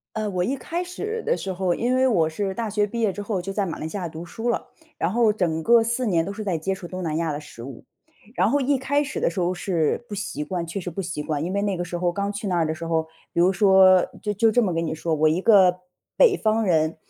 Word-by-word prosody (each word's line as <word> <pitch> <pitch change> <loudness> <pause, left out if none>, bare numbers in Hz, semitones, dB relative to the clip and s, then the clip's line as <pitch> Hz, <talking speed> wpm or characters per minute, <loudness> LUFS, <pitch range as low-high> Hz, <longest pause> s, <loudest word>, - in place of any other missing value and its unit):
呃， 215 -1 -1
我 180 -2 -1
一 270 +8 -1
开 335 +7 -4
始 425 +6 -5
的 480 +2 +1
时 190 - -4
候， 180 -1 0
因 245 +6 0
为 260 0 +3
我 165 -9 +2
是 190 +4 -3
大 225 0 -3
学 205 0 +1
毕 230 +3 -4
业 210 -3 +2
之 205 - -9
后， 195 -3 -2
就 195 +2 -5
在 200 0 -1
马 165 - -5
来 155 - -4
西 200 - -5
亚 175 -3 -3
读 160 +1 -8
书 225 +7 -6
了， 235 - -1 0.3
然 175 - 0
后 225 -2 +3
整 160 -5 -1
个 235 -1 +5
4 235 +2 -1
年 170 -6 +2
都 200 - -5
是 215 +1 -6
在 190 -4 -1
接 190 +5 -1
触 180 -2 -9
东 185 +1 -6
南 160 -2 -2
亚 165 -2 -1
的 145 - -4
食 135 -6 -11
物。 130 -2 -9 0.5
然 - - +3
后 285 +2 +2
一 275 +1 +2
开 285 +3 0
始 285 - -5
的 - - +1
时 170 - -5
候 180 0 +1
是 175 +5 -1
不 210 - -8
习 190 -7 -4
惯， 170 +2 -3
确 180 +4 -4
实 175 -1 -5
不 195 - -4
习 170 -4 -4
惯。 150 -1 -2
因 180 - -3
为 200 +1 0
那 200 -2 0
个 175 - -3
时 175 0 -5
候 175 0 0
刚 200 +2 -2
去 205 0 -5
那 180 - 0
儿 165 - +2
的 155 - -1
时 165 - -7
候， 165 -1 +1 0.3
比 - - 0
如 180 +2 +5
说 190 -1 +6 0.2
就 210 - -2
就 220 +2 +3
这 245 - +3
么 190 -5 +1
跟 165 0 -1
你 160 - -2
说， 160 0 -1
我 155 +1 +3
一 165 +4 +1
个 190 -5 +5 0.4
北 450 -6 +5
方 220 0 +1
人， 160 -4 +2
190 Hz, 310 characters per minute, -24 LUFS, 170-220 Hz, 0.5 s, 说